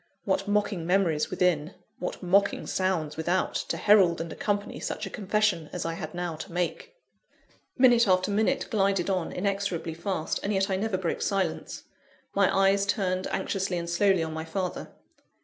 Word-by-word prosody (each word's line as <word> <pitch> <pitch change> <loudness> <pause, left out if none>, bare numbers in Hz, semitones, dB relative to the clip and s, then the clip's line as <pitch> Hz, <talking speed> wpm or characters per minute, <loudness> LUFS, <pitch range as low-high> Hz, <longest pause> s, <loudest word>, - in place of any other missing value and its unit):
What 195 0 0
mocking 205 -4 0
memories 175 -5 +2
within, 180 -3 0 0.2
what 180 - -5
mocking 200 +3 +2
sounds 170 -6 -1
without, 175 +3 0
to - - -2
herald 195 -5 +5
and 165 -1 -4
accompany 205 0 -2
such - - -4
a 195 - -7
confession 200 -6 0
as 180 - -4
I 165 - -1
had 165 -1 -6
now 175 -2 -3
to 175 +4 -8
make! 180 - -3 0.8
Minute 245 -3 +5
after 185 +1 +2
minute 220 +6 +1
glided 195 -3 +1
on, 185 -3 -1
inexorably 195 -4 -2
fast; 170 -1 -2
and 200 - -2
yet 195 0 +1
I - - +2
never 200 0 -1
broke 180 -3 -2
silence. 195 -5 -2 0.5
My 200 -1 +3 0.2
eyes 200 0 0
turned 185 -2 0
anxiously 190 -2 -2
and 170 0 -4
slowly 185 0 +2
on 160 -1 -4
my 160 0 -4
father. 180 +3 -4
185 Hz, 165 wpm, -27 LUFS, 170-200 Hz, 0.8 s, herald